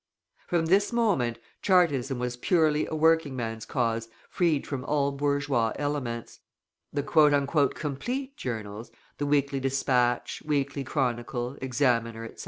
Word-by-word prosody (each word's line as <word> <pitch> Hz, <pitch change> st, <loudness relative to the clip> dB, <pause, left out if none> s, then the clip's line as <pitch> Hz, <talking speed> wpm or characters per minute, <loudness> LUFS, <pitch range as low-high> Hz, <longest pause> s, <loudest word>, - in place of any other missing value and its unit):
From 170 Hz, -2 st, +1 dB
this 195 Hz, +6 st, +3 dB
moment 190 Hz, -, +1 dB, 0.2 s
Chartism 145 Hz, -9 st, +2 dB
was 125 Hz, 0 st, -2 dB
purely 155 Hz, +2 st, +2 dB
a 160 Hz, -, -4 dB
working 160 Hz, -3 st, +3 dB
man's 115 Hz, -2 st, -4 dB
cause 115 Hz, -3 st, -1 dB, 0.2 s
freed 165 Hz, -5 st, +1 dB
from 135 Hz, -3 st, -4 dB
all 140 Hz, -1 st, +1 dB
bourgeois 140 Hz, -4 st, 0 dB
elements. 140 Hz, -6 st, -3 dB, 0.5 s
The 145 Hz, -1 st, -1 dB
"Complete" 150 Hz, -, +1 dB
journals, 110 Hz, -2 st, -5 dB, 0.3 s
the 145 Hz, -, -1 dB
Weekly 140 Hz, -1 st, +1 dB
Dispatch, 130 Hz, -2 st, 0 dB
Weekly 140 Hz, -2 st, -1 dB
Chronicle, 125 Hz, -2 st, -2 dB
Examiner, 120 Hz, -4 st, 0 dB
etc. 115 Hz, -, -11 dB
140 Hz, 120 wpm, -27 LUFS, 120-150 Hz, 0.5 s, this